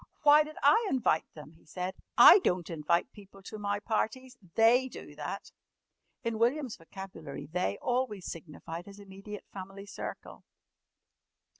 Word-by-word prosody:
"Why 300 +1 +7
did 305 0 -10
I 430 +10 +5
invite 245 -11 +2
them?" 150 0 -11
he 165 - -23
said. 180 +4 -4 0.2
"I - - +10
don't 180 - -1
invite 165 +2 0
people 195 -1 -15
to 215 +2 -8
my 205 0 -1
parties. 245 +4 -2 0.2
They 240 +3 +5
do - - -10
that." - - -6 0.7
In 230 -2 -2
William's 250 +1 +1
vocabulary 165 -5 -9
"they" 155 - -2
always 245 -6 -1
signified 165 +1 -7
his 200 0 -11
immediate 200 +1 -10
family 195 +1 -8
circle. 205 - -8
200 Hz, 140 wpm, -30 LUFS, 175-240 Hz, 0.7 s, I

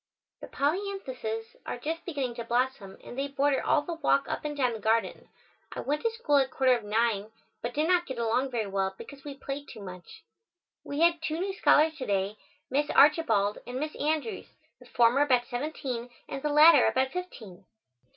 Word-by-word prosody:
The - - -9
polyanthuses 280 - -3
are - - -5
just 325 +6 -4
beginning 275 -8 -3
to 235 - -3
blossom 235 -4 -1
and - - -9
they 275 +2 -2
border 275 0 +1
all 295 - +2
the 340 - -4
walk 285 -3 +1
up - - -4
and 295 -1 -4
down 250 -4 +1
the 220 - -6
garden. 220 +2 0 0.4
I - - -4
went 295 +2 -1
to 460 - +1
school 445 -11 +1
at 265 -1 +3
quarter 260 0 +3
of 235 - -5
nine, 215 -1 0 0.3
but 240 +1 -4
did 305 +2 +1
not 355 -1 +2
get 260 - -5
along 235 +3 0
very 235 -4 -2
well 195 -1 -2
because 275 -1 -11
we 285 -2 -8
played 280 +1 -6
too 215 -4 -10
much. 180 -2 -11 0.6
We 285 +2 -4
had 335 -1 +4
two 320 -1 -2
new 385 +2 -2
scholars 315 -4 +4
to 260 - -5
day, 200 +1 -1 0.3
Miss 290 +2 +1
Archibald 285 -10 +4
and 250 +1 -4
Miss 305 +1 -4
Andrews, 315 +8 -2 0.3
the - - -16
former 240 +3 +3
about 255 -4 +3
seventeen 250 -2 -4 0.2
and 275 - -5
the 300 - -1
latter 300 -1 +7
about 260 0 +1
fifteen. 230 - -8
270 Hz, 195 wpm, -28 LUFS, 235-305 Hz, 0.6 s, latter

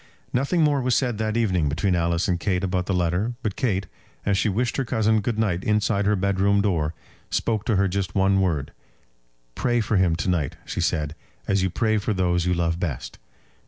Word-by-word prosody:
Nothing 140 +7 +2
more 145 -2 +2
was 125 -1 +1
said 120 -5 0
that 110 0 -1
evening 95 -10 +1
between 85 +6 0
Alice 85 +1 +1
and 90 -3 0
Kate 90 0 0
about 90 -1 -1
the - - -1
letter; 90 +7 0
but 105 -3 -2
Kate, 100 -6 0 0.4
as 100 - +2
she 100 - +1
wished 120 +5 -1
her 135 - +1
cousin 110 -2 +1
good 110 +1 -2
night 95 -5 0
inside 105 -1 +1
her 105 - +3
bedroom 100 +1 +2
door, 85 -6 0 0.3
spoke 110 -2 -1
to 110 - +1
her 100 0 +3
just 95 0 -3
one 95 0 +3
word 80 -7 -1 0.8
"Pray 120 - +1
for 110 -2 +1
him 90 -3 +3
to 85 - -3
night," 85 -7 0
she - - -3
said, 75 -2 0 0.3
"as 100 -1 +2
you 95 - +1
pray 110 +3 +1
for 105 +1 -1
those 90 -1 +1
you 90 - +2
love 85 -1 0
best." 80 -8 -4
100 Hz, 205 wpm, -24 LUFS, 90-110 Hz, 0.8 s, her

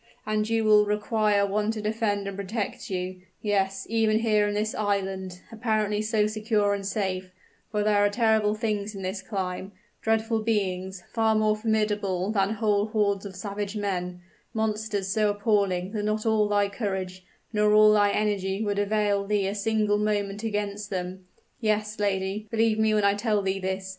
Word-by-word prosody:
And 215 0 0
you 225 0 +1
will 210 -1 +6
require 210 -1 +2
one 210 +2 0
to 220 - -5
defend 210 -2 -1
and 200 - -4
protect 200 +2 -4
you 185 -1 -4 0.2
yes, 195 -2 0
even 220 -1 +2
here 215 -2 +2
in 205 - -2
this 215 +1 -1
island, 190 -3 -2
apparently 215 -2 0
so 215 -1 +1
secure 215 -1 +1
and 200 -1 -3
safe; 190 -2 -2 0.4
for 210 -1 0
there 205 -1 +3
are 205 - +4
terrible 220 -1 +2
things 210 -2 -2
in 195 - -6
this 190 +2 -3
clime 190 -1 -4 0.3
dreadful 225 0 +1
beings, 190 -4 -1
far 225 -1 +2
more 215 0 +3
formidable 210 -3 0
than 200 -1 +1
whole 210 -1 +1
hordes 205 -2 0
of 190 - -11
savage 200 +1 -4
men 180 -3 -3 0.3
monsters 215 -2 -1
so 210 +2 +2
appalling 200 -3 +1
that 215 -1 -2
not 215 +1 -1
all 220 -2 +3
thy 205 -1 +2
courage, 190 -3 -4 0.3
nor 210 0 +3
all 215 0 +7
thy 205 -1 +4
energy 200 -1 0
would 205 -1 -1
avail 205 -1 +1
thee 205 -1 +1
a 195 - -1
single 210 0 +1
moment 205 -1 -1
against 205 -2 -3
them. 185 -1 -5 0.3
Yes, 215 -1 -1
lady, 200 +1 -1
believe 225 -1 +2
me 220 0 +3
when 210 - +2
I 200 - +5
tell 210 -1 0
thee 195 0 -1
this! 190 0 -3
210 Hz, 175 wpm, -26 LUFS, 195-215 Hz, 0.4 s, all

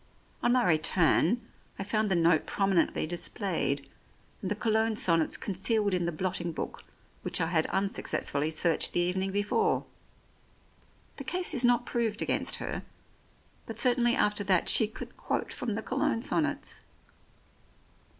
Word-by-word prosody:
On 240 - +2
my 250 -1 +3
return 175 +5 +3 0.4
I - - -3
found 215 +1 0
the 190 - +2
note 165 -2 +3
prominently 195 -6 +1
displayed, 170 -4 -2 0.5
and 190 - -3
the 210 - 0
Cologne 220 0 +1
sonnets 170 -9 +2
concealed 200 +1 0
in 175 -2 0
the - - 0
blotting 175 0 -2
book - - -6 0.4
which - - -2
I - - +2
had 160 -1 +1
unsuccessfully 190 -6 0
searched 160 0 +1
the - - +2
evening 185 +2 0
before. 205 - +1 1.3
The - - -6
case 360 -2 +1
is 255 -4 +1
not 245 0 +3
proved 230 -3 -1
against - - +1
her, - - -4 0.9
but 225 0 -5
certainly 240 -1 +4
after 210 0 +1
that 185 -3 +3
she 220 - +4
could 220 - -9
quote - - -3
from 225 -4 -3
the 220 - -4
Cologne 255 -2 -1
sonnets. - - -1
200 Hz, 145 wpm, -29 LUFS, 175-230 Hz, 1.3 s, certainly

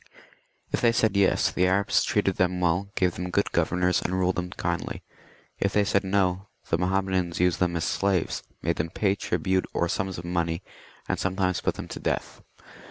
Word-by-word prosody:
If - - 0
they 115 -1 +4
said 110 -3 +2
Tes, 100 -1 +3
the 90 - +2
Arabs 100 +2 +2
treated 100 -3 +1
them 90 0 +1
well, 90 +3 +1
gave 90 -1 +2
them 90 0 -4
good 100 +3 0
governors, 90 +2 +1
and 95 - -1
ruled 95 0 +1
them 90 0 -2
kindly. - - -3 0.6
If 100 - 0
they 105 - +4
said 100 0 +1
No, 95 0 +1 0.2
the 80 - +2
Mahommedans 95 -2 0
used 90 -1 +2
them 90 -1 +1
as 85 - -1
slaves, 95 -3 0 0.2
made - - 0
them 80 +1 -1
pay 95 +3 +1
tribute, 95 -1 0
or 85 - +2
sums 95 +2 -2
of 85 - -7
money, 85 0 -1 0.4
and - - -1
sometimes 95 -1 0
put - - 0
them - - -7
to - - -6
death. - - -3
90 Hz, 190 wpm, -26 LUFS, 90-95 Hz, 0.6 s, they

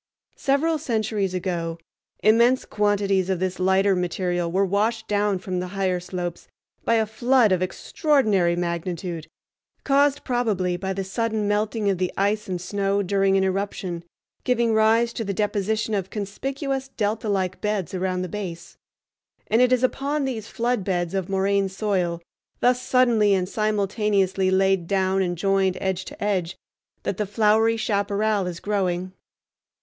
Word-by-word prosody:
Several 300 +3 +1
centuries 215 - -1
ago 170 -2 -2 0.5
immense 235 +4 +4
quantities 200 -2 +1
of 190 - +1
this 185 0 -2
lighter 190 +1 +3
material 175 -1 -1
were 195 +3 +2
washed 220 +4 0
down 205 -1 +1
from 185 0 -3
the 180 - -3
higher 185 -2 +1
slopes 175 -1 -5 0.4
by 230 - +2
a 220 -1 +3
flood 235 +1 +3
of 185 -1 +2
extraordinary 200 - +1
magnitude, 170 -1 -3 0.6
caused 280 0 +3
probably 215 -8 0
by 190 +2 -3
the 195 0 -2
sudden 215 +2 -1
melting 210 +1 0
of 195 -3 +1
the 185 -1 0
ice 205 +2 0
and 180 -2 -3
snow 200 +2 -1
during 195 0 +2
an 190 - +2
eruption, 190 -2 -2 0.4
giving 235 -2 +2
rise 225 +2 +3
to 225 - -3
the 200 -2 -3
deposition 215 +1 -1
of 195 -2 -1
conspicuous 270 +6 -3
delta 215 -3 -2
like 190 -2 -1
beds 210 -5 -2
around 185 0 -1
the - - -3
base. 180 -3 -7 0.7
And 225 +3 +4
it 250 0 +4
is 255 0 +3
upon 280 +3 0
these 230 -5 -4
flood 240 -3 -1
beds 175 -2 -1
of 190 -1 -2
moraine 195 0 +1
soil, 185 -4 -1 0.4
thus 250 0 +3
suddenly 235 -6 +3
and 180 -1 0
simultaneously 200 -2 +1
laid 190 -2 +2
down 190 0 +1
and 175 -2 -1
joined 195 0 +1
edge 190 -1 -2
to - - -8
edge, 190 -4 -1 0.5
that 190 - -2
the 210 - -1
flowery 220 +2 +3
chaparral 205 -2 0
is 175 -2 -5
growing. 185 -3 -1
200 Hz, 155 wpm, -24 LUFS, 185-220 Hz, 0.7 s, immense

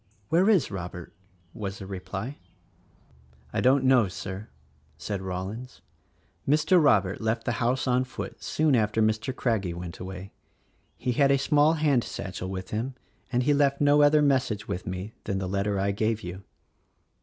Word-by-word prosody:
"Where 180 +5 +4
is 190 - +3
Robert?" 90 -2 -6 0.4
was 100 -2 -5
the 95 - -8
reply. 95 +7 -6 1.1
"I - - 0
don't 130 +1 +4
know, 130 -5 +5
Sir," 95 +3 -7 0.5
said 100 +2 -4
Rollins, 95 +7 -6 0.7
"Mr. 155 +4 +4
Robert 100 -8 +3
left 115 +1 -1
the - - +1
house 125 +2 +1
on 125 0 +2
foot 130 - -7
soon 155 -3 +2
after 110 -1 +1
Mr. 110 +3 +1
Craggie 100 -10 -1
went 85 -1 -7
away 95 +1 -8 0.3
— - - -41
he 125 - -1
had 140 +3 +3
a 140 - +5
small 150 +3 +3
hand 150 -6 +2
satchel 95 -1 -5
with 95 -1 -6
him 120 +5 -3 0.4
and 125 0 +2
he 145 +3 +3
left 140 -1 +2
no 145 0 +5
other 150 +1 +5
mes 135 -2 +3
sage 105 -1 -5
with 95 -2 -4
me 95 +4 -5
than 100 - -1
the 95 -1 -2
letter 100 +1 -1
I 100 +1 +1
gave 110 +2 -1
you." 90 +2 -6
110 Hz, 170 wpm, -27 LUFS, 95-135 Hz, 1.1 s, know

